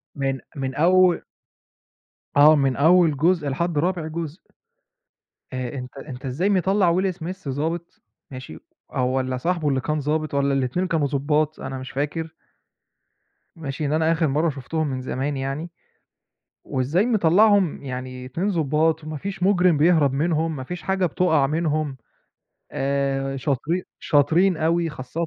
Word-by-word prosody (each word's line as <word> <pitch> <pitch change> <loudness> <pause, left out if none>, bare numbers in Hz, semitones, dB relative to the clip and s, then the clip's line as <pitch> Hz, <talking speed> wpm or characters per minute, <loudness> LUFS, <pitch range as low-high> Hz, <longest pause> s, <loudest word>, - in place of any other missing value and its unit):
من 135 -1 -1 0.2
من 135 -1 -3
أول 180 +2 +4 1.2
آه، 150 +2 +8
من 135 -3 +1
أول 160 +1 +4
جزء 165 0 +2
لحد 170 +3 -1
رابع 170 +1 0
جزء. 160 +1 -5 1.1
آآ، 130 -1 -4
أنتَ 125 +1 -8
أنتَ 135 -2 -8
إزاي 145 +10 0
مطلّع 190 -2 +2
Will 190 -1 0
Smith 175 0 -7
ضابط، 160 +5 -4 0.3
ماشي، 130 - -9 0.4
آآ - - 0
والّا 130 0 0
صاحبه 165 +3 -1
اللي 135 -2 +1
كان 150 +4 -2
ضابط، 155 +1 -1
والّا 140 0 +2
الاتنين 135 +7 0
كانوا 160 -5 +1
ضُبَّاط؟ 150 +2 0
أنا 135 0 -5
مش 130 0 -8
فاكر. 155 +3 -3 1.2
ماشي، 150 -2 -5
لأن 145 0 0
أنا 160 +1 +2
آخِر 165 -1 +1
مرَّة 150 +4 +1
شُفتهم 155 +3 -3
من 130 -2 -3
زمان 135 +2 -3
يعني، 135 +6 -4 0.9
وإزاي 145 - 0
مطلّعهم 205 -4 +3
يعني 130 -1 -6
اتنين 165 +10 -2
ضُبَّاط 160 -1 +1
وما 155 0 -5
فيش 190 +3 -6
مُجرم 180 -3 +4
بيهرب 155 -2 +4
منهم، 160 +2 0
ما 130 - -5
فيش 180 +6 -6
حاجة 190 -1 +1
بتقع 160 -4 +2
منهُم، 155 -2 -1 0.8
آآ 135 0 -1
شاطرين 145 +7 -1 0.2
شاطرين 165 +5 +3
أوي 165 +2 +1
خاصةً 150 +4 -4
155 Hz, 145 wpm, -23 LUFS, 135-170 Hz, 1.2 s, آه